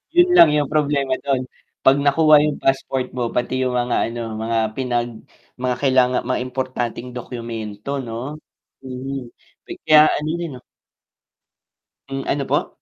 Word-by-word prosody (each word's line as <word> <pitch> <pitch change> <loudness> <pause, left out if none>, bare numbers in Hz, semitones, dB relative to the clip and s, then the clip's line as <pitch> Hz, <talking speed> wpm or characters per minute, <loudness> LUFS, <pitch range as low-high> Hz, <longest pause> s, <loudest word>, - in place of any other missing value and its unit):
'Yun 350 +1 +6
lang 165 - +9
yung 145 -2 +1
problema 140 -3 +1
do'n 135 -2 0 0.4
'pag 135 - +5
nakuha 155 +2 +5
yung 150 -1 -1
passport 135 -1 0
mo 120 -2 -2
pati 130 +1 -1
yung 130 - 0
mga 120 0 -1 0.2
ano 120 0 -5
mga 115 +1 -2 0.2
pinag 120 -2 -1 0.5
mga 125 0 -1
kailanga 130 -2 +3
mga 130 -1 0
importanteng 125 -1 -4
dokumento 115 -3 -6
'no, 120 +5 -6 0.5
mm, 130 -1 -6 0.3
pi - - -8
kaya 155 0 +7
ano 150 +1 -2
din 170 -2 -4
'no 125 - -9 1.5
Hmm, 135 0 -4
ano 140 -1 -1
po? - - 0
130 Hz, 145 wpm, -21 LUFS, 120-140 Hz, 1.5 s, lang